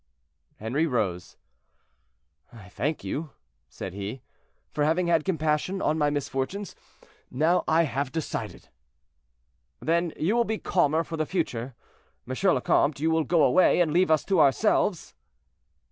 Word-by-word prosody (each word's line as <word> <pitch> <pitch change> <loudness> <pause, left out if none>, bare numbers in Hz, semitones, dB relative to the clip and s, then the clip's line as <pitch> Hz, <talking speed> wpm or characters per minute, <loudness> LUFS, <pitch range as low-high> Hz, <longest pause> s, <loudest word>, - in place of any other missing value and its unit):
Henri 135 +10 0
rose. 100 - -2 1.1
"I 105 -4 -13
thank 140 +10 -3
you," 155 +1 -4 0.4
said 95 - -7
he, 100 +6 -6 0.5
"for 150 - -1
having 165 +4 +2
had 165 -2 +2
compassion 160 +2 -1
on 155 - +1
my 150 -1 +3
misfortunes; 145 +7 -3 0.5
now 160 +7 +2
I 160 +1 +4
have 135 -2 -2
decided." 160 -2 -5 1.1
"Then 170 +1 0
you 185 +9 +1
will 240 - +3
be 220 -1 -2
calmer 160 -4 +1
for 165 0 -6
the 155 -1 -1
future. 130 -9 -3 0.5
M. 130 - -4 0.2
le 125 - +1
Comte, 140 +2 +2
you 160 +2 +1
will 160 0 +2
go 170 -3 +3
away, 180 +9 +4
and 165 -4 +2
leave 180 +1 +3
us 155 -2 +2
to 195 - +1
ourselves?" 135 -4 +2
155 Hz, 145 wpm, -26 LUFS, 130-170 Hz, 1.1 s, I